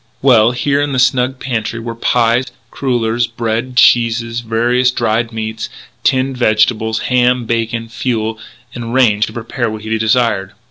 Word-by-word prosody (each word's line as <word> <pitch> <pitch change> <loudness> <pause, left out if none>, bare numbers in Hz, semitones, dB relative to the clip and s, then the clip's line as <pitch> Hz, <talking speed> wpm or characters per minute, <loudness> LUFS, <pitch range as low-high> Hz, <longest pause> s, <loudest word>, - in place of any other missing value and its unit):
Well, 120 -5 +5
here 140 +4 0
in 145 -1 -1
the - - -1
snug 130 +1 +2
pantry 115 -3 -3
were 115 0 -5
pies, 120 +1 +1 0.2
crullers, 120 -3 0
bread, 115 +2 -3
cheeses, 115 -1 +3
various 120 +2 +1
dried 115 -1 -1
meats, 110 0 -5 0.3
tinned 130 0 +1
vegetables, 110 -1 +1
ham, 125 -1 +1
bacon, 115 0 -2
fuel 115 -2 -3 0.3
and 120 0 -5
range 110 -5 +3
to - - -9
prepare 120 +1 -3
what 110 0 -7
he 110 +1 -2
desired. 110 -3 +1
115 Hz, 145 wpm, -15 LUFS, 110-125 Hz, 0.3 s, Well